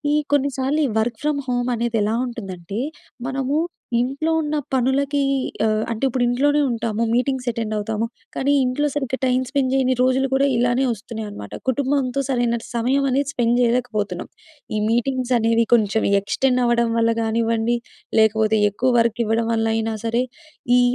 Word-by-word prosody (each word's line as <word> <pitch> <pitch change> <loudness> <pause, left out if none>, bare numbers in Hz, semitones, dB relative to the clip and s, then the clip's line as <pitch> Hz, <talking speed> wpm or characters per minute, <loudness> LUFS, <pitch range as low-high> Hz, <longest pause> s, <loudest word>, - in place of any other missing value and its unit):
ఈ - - +4 0.2
కొన్నిసార్లు 280 +1 +1
ఈ - - -3
వర్క్ 230 0 -3
ఫ్రమ్ 300 -1 0
హోమనేదెలా 235 -3 0
ఉంటుందంటే, 195 -3 -6 0.5
మనమూ 270 +2 -1 0.4
ఇంట్లో 275 +6 -1
ఉన్న 305 0 -2 0.2
పనులకీ 270 +3 +1 0.5
ఆహ్, 215 -1 +1
అంటే 230 +3 -4
ఇప్పుడు 255 -1 0
ఇంట్లోనే 290 +5 +2
ఉంటాము. 230 -1 -1
మీటింగ్సె 255 0 0
అటెండవుతాము, 220 0 -2 0.3
కానీ 275 +2 +1
ఇంట్లో 255 +4 0
సరిగ్గా 265 -3 -2
టైమ్ 255 0 +2
స్పెండ్ 275 -2 0
జెయ్యని 260 -1 +2
రోజులు 260 +1 +2
గుడా 275 +1 +3
ఇలానే 245 +2 +2
ఒస్తున్నయనమాట. 215 - -7 0.2
కుటుంబంతో 275 0 0
సరైన 240 -2 +1
ట్ - - -10
సమయమనేది 270 +3 +1
స్పెండ్ 240 -1 +2
జెయలేకపోతున్నాం. 230 -6 0 0.5
ఈ 215 - +1
మీటింగ్సనేవి 240 -1 +1
కొంచెం 220 -1 +1 0.2
ఎక్స్‌టెండవ్వడం 240 +1 +1
వల్ల 230 0 +3
గానివ్వండి, 230 +1 +1 0.4
లేకపోతే 220 0 +3
ఎక్కువ 255 +6 +1
వర్క్ 230 0 +1
ఇవ్వడం 225 +1 0
వల్లయినా 225 0 0
సరే, 230 +2 +1 0.6
ఈ - - +5
240 Hz, 135 wpm, -21 LUFS, 225-265 Hz, 0.6 s, ఈ